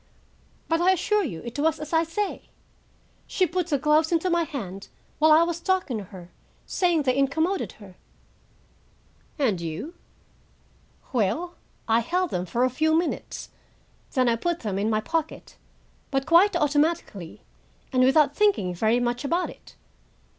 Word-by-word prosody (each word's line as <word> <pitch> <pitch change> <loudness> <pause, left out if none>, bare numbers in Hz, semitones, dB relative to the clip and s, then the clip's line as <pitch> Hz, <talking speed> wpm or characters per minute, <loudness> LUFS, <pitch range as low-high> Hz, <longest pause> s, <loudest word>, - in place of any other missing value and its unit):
But 330 +1 +1
I 370 +2 +5
assure 415 +3 +1
you 165 - -5
it 235 +4 -6
was 315 +1 +1
as 305 +1 -7
I 325 0 +4
say. 390 +5 -4 0.8
She 370 - +1
put 360 0 -2
the 295 -4 +1
gloves 305 +3 +2
into 345 +2 +1
my 340 -1 +2
hand 200 - -7 0.3
while 310 +1 +5
I 315 +2 +7
was 340 0 -2
talking 360 - 0
to 200 - -8
her, 180 -2 -12 0.3
saying 345 -4 +1
they 255 -2 +1
incommoded 320 +7 0
her." 195 -4 -15 1.4
"And 225 - +1
you?" 170 - -5 1.2
"Well, 255 - 0 0.3
I 225 0 +4
held 355 +9 -1
them 180 +1 -2
for 235 +8 0
a 255 - +3
few 315 +4 +2
minutes, 340 +1 -3 0.6
then 255 -2 +2
I 230 -1 +2
put 345 +6 -2
them 200 -4 -2
in 210 +2 0
my 215 -1 +1
pocket, 320 +5 -4 0.5
but 270 -1 -1
quite 345 +4 +5
automatically, 295 - -1 0.5
and 255 0 +4
without 280 +2 +4
thinking 400 - +2
very 220 +6 +2
much 245 +2 -1
about 340 +5 0
it. - - -17
300 Hz, 155 wpm, -25 LUFS, 230-340 Hz, 1.4 s, I